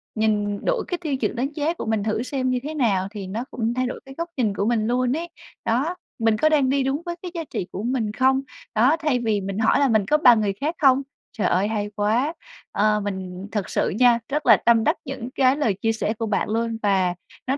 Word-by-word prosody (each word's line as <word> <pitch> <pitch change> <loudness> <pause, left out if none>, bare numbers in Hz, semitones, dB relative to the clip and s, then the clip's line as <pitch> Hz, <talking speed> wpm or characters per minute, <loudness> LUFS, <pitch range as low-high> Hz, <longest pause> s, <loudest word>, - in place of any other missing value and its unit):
nhìn 210 -2 0
đổi - - +1
cái 355 - -2
tiêu 300 -5 -1
chuẩn - - -2
đánh 260 +4 -1
giá 310 +2 0
của - - -6
mình 220 -2 0
thử 215 +2 -1
xem 255 -1 -2
như 250 -1 +1
thế 305 +2 -4
nào, 205 -10 +1
thì 200 -3 -6
nó 215 +5 -3
cũng 230 -1 -1
thay 255 +1 0
đổi 250 - -4
cái 270 0 -11
góc 335 +1 -3
nhìn 215 -5 +1
của 200 - -1
mình 220 -1 +1
luôn 250 +3 +1
ấy. 340 +1 -5 0.4
Đó, 275 +10 0 0.2
mình 225 -1 +2
có 310 - +3
đang 285 -4 +3
đi 275 0 +2
đúng 270 +3 -1
với 345 0 -3
cái 360 - -5
giá 330 - -2
trị 185 - -5
của 195 - -5
mình 235 -3 -1
không? 265 +2 +3 0.3
Đó, 255 +9 +4
thay 300 -6 +1
vì 220 -4 0
mình 195 +2 -4
hỏi 225 +4 +3
là 280 - +4
mình 220 -4 +2
có 300 - +3
bằng 245 -7 +6
người 200 -2 0
khác 315 +4 -1
không? 270 -2 +5 0.4
Trời 195 - +1
ơi, 190 +3 +2
hay 210 -1 -2
quá! 225 +9 +1 0.4
Ờ, 210 0 +2
mình 190 -1 -5
thực 205 -4 -2
sự - - 0
nha, 245 -2 +5
rất 295 +2 -1
là - - +7
tâm 230 -1 +5
đắc - - +2
những 260 -3 -5
cái 260 0 +4
lời 235 -9 +1
chia 225 - +2
sẻ 220 -1 -1
của 225 0 -4
bạn 210 -1 -1
luôn 230 +1 -1
và 190 -3 +2 0.3
nó 270 - +1
235 Hz, 255 wpm, -23 LUFS, 210-270 Hz, 0.4 s, là